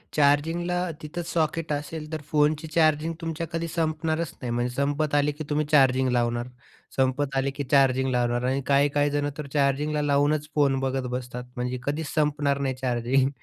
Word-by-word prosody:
चार्जिंगला 165 Hz, +5 st, +2 dB
तिथंच 165 Hz, +3 st, -6 dB
सॉकेट 160 Hz, -1 st, 0 dB
असेल 150 Hz, +2 st, -5 dB
तर 155 Hz, -, -3 dB
फोनची 150 Hz, +1 st, +2 dB
चार्जिंग 155 Hz, 0 st, +2 dB
तुमच्या 165 Hz, 0 st, -3 dB
कधी 165 Hz, 0 st, -2 dB
संपणारच 160 Hz, -1 st, -1 dB
नाही. 125 Hz, -2 st, -3 dB
म्हणजे 120 Hz, +1 st, -1 dB
संपत 145 Hz, +2 st, 0 dB
आले 145 Hz, 0 st, +3 dB
की 150 Hz, +2 st, -7 dB
तुम्ही 150 Hz, 0 st, +1 dB
चार्जिंग 130 Hz, -3 st, +4 dB
लावणार, 120 Hz, 0 st, 0 dB, 0.5 s
संपत 135 Hz, +1 st, 0 dB
आले 135 Hz, +1 st, +1 dB
की 140 Hz, +1 st, -4 dB
चार्जिंग 130 Hz, -1 st, +4 dB
लावणार 120 Hz, -1 st, +1 dB
आणि 135 Hz, +1 st, 0 dB
काही-काही 145 Hz, +1 st, +3 dB
जण 145 Hz, 0 st, 0 dB
तर 150 Hz, -2 st, -5 dB
चार्जिंगला 150 Hz, +1 st, +1 dB
लावूनच 145 Hz, +1 st, +2 dB
फोन 140 Hz, -3 st, +3 dB
बघत 135 Hz, -1 st, -1 dB
बसतात, 125 Hz, 0 st, -5 dB
म्हणजे 125 Hz, +1 st, -3 dB
कधीच 145 Hz, +3 st, -2 dB
संपणार 145 Hz, -2 st, +1 dB
नाही 135 Hz, -1 st, 0 dB
चार्जिंग. 130 Hz, +1 st, +1 dB
145 Hz, 165 wpm, -26 LUFS, 130-155 Hz, 0.5 s, चार्जिंग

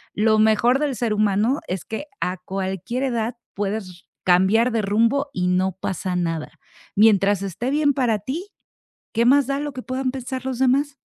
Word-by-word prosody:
lo 215 Hz, +1 st, +3 dB
mejor 220 Hz, +4 st, +4 dB
del 285 Hz, -3 st, -1 dB
ser 230 Hz, -2 st, -1 dB
humano 210 Hz, +6 st, +2 dB
es 185 Hz, -3 st, -4 dB
que 255 Hz, +7 st, -5 dB
a 185 Hz, +1 st, -2 dB
cualquier 190 Hz, +6 st, -4 dB
edad 235 Hz, -2 st, -1 dB, 0.2 s
puedes 205 Hz, +1 st, -2 dB
r -, -, -11 dB, 0.3 s
cambiar 190 Hz, +7 st, +4 dB
de 225 Hz, -1 st, +1 dB
rumbo 230 Hz, +8 st, +1 dB
y 180 Hz, -1 st, -1 dB
no 185 Hz, 0 st, +1 dB
pasa 185 Hz, -1 st, -3 dB
nada, 165 Hz, -3 st, -2 dB, 0.4 s
mientras 200 Hz, -2 st, +4 dB
esté 200 Hz, +7 st, -3 dB
bien 290 Hz, -1 st, +2 dB
para 245 Hz, -5 st, +1 dB
ti, 300 Hz, -, -5 dB, 0.7 s
¿qué 230 Hz, +1 st, +3 dB
más 275 Hz, +1 st, +5 dB
da 275 Hz, 0 st, -1 dB
lo 295 Hz, -1 st, -4 dB
que 255 Hz, -, -6 dB
puedan 255 Hz, 0 st, -2 dB
pensar 260 Hz, 0 st, -5 dB
los 260 Hz, -2 st, -3 dB
demás? 275 Hz, +2 st, +2 dB
225 Hz, 180 wpm, -22 LUFS, 195-260 Hz, 0.7 s, más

